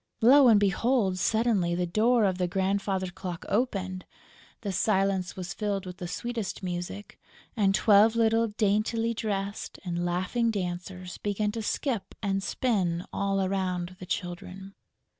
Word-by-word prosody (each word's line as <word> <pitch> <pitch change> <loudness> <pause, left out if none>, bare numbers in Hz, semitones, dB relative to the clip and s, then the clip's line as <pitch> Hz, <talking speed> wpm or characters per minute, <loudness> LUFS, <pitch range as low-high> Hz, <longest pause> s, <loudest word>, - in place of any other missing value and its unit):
Lo 265 +4 +7
and 220 -3 +7
behold, 205 -1 +1
suddenly 215 -5 +2
the 180 0 0
door 225 +6 +3
of 190 -1 0
the 180 - +1
grandfather's 190 0 -1
clock 180 -2 -6
opened, 195 -5 -1 0.6
the 205 -3 -3
silence 190 -2 +1
was 185 +1 -5
filled 205 -2 -2
with 180 0 -8
the 175 - -5
sweetest 225 +2 -4
music 180 +3 -5 0.4
and 195 -4 +3
twelve 215 +3 +5
little 230 0 +3
daintily 215 +2 0
dressed 205 -2 -3
and 175 -1 -2
laughing 185 +7 0
dancers 180 -2 -4
began 205 0 -1
to 225 +1 -4
skip 230 0 -2
and 195 -1 0
spin 190 -6 0
all 195 -1 0
around 185 -2 -2
the 185 - -9
Children. 185 +2 -5
195 Hz, 140 wpm, -28 LUFS, 185-220 Hz, 0.6 s, Lo